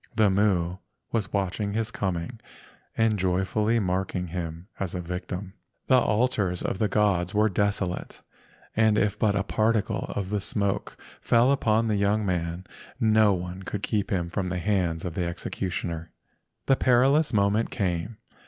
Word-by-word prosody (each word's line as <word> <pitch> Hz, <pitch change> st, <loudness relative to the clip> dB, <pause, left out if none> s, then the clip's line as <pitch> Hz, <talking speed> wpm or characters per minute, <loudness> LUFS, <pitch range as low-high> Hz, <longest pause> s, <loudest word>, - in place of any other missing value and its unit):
The 105 Hz, -3 st, +4 dB
Mu 95 Hz, -3 st, +1 dB, 0.3 s
was 110 Hz, -3 st, -1 dB
watching 100 Hz, +1 st, -1 dB
his 110 Hz, 0 st, -1 dB
coming 95 Hz, +4 st, -3 dB, 0.6 s
and 110 Hz, -2 st, +2 dB
joyfully 95 Hz, +5 st, +1 dB
marking 90 Hz, -2 st, -1 dB
him 85 Hz, 0 st, -5 dB
as 95 Hz, -3 st, -3 dB
a -, -, -2 dB
victim. 90 Hz, +2 st, -5 dB, 0.3 s
The 130 Hz, -1 st, +5 dB
altars 105 Hz, -6 st, +1 dB
of 95 Hz, -, -2 dB
the 110 Hz, -, +2 dB
gods 100 Hz, -2 st, +1 dB
were 105 Hz, +1 st, +4 dB
desolate, 100 Hz, -2 st, -1 dB, 0.6 s
and 110 Hz, -1 st, +4 dB
if 105 Hz, -2 st, +1 dB
but 105 Hz, -2 st, +2 dB
a 100 Hz, -, +1 dB
particle 110 Hz, +1 st, 0 dB
of 100 Hz, +1 st, -2 dB
smoke 100 Hz, 0 st, -1 dB, 0.2 s
fell 120 Hz, +3 st, +4 dB
upon 115 Hz, -4 st, +2 dB
the 105 Hz, -2 st, +1 dB
young 100 Hz, +2 st, +1 dB
man 90 Hz, -1 st, -2 dB, 0.3 s
no 110 Hz, -2 st, +4 dB
one 90 Hz, +1 st, -5 dB
could 100 Hz, +2 st, -5 dB
keep 105 Hz, -2 st, -1 dB
him 85 Hz, -3 st, -1 dB
from 95 Hz, -1 st, -2 dB
the 90 Hz, 0 st, -2 dB
hands 90 Hz, -3 st, 0 dB
of 90 Hz, -, -3 dB
the 90 Hz, +1 st, -1 dB
executioner. 85 Hz, -1 st, -4 dB, 0.6 s
The 135 Hz, -, +3 dB
perilous 135 Hz, +5 st, +4 dB
moment 105 Hz, +1 st, +2 dB
came. 95 Hz, +1 st, -2 dB
100 Hz, 155 wpm, -26 LUFS, 90-110 Hz, 0.6 s, The